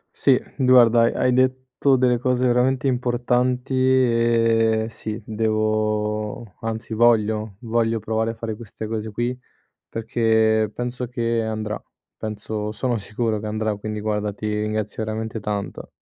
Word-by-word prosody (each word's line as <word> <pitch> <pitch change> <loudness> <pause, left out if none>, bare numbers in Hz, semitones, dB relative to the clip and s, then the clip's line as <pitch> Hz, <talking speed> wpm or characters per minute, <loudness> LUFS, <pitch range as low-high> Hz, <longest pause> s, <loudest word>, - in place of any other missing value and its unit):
Sì, 135 -3 +4 0.2
guarda, 125 -3 +6
hai 115 - +2
hai 125 - +2
detto 130 +1 +2
delle 125 -1 +3
cose 125 +1 +1
veramente 125 +2 +2
importanti, 125 +1 0
ehm, 115 -3 +3
sì, 110 -1 -6
devo 110 -1 -1
anzi 110 0 -4
voglio, 110 -3 +2
voglio 115 -1 0
provare 110 +1 -1
a - - -7
fare 110 -1 -5
queste 110 -1 -8
cose 110 -1 -4
qui, 120 +3 -2 0.5
perché 110 -1 +1
penso 125 0 -3
che 115 -1 -1
andrà, 110 -1 -3 0.3
penso 105 0 -4
sono 120 +1 -1
sicuro 110 +2 -2
che 105 - -5
andrà, 110 0 -1
quindi 105 +1 -5
guarda, 105 -1 -1
ti 105 +2 -6
ringrazio 105 0 -2
veramente 110 +1 -4
tanto. 105 -1 -4
110 Hz, 135 wpm, -22 LUFS, 110-120 Hz, 0.5 s, guarda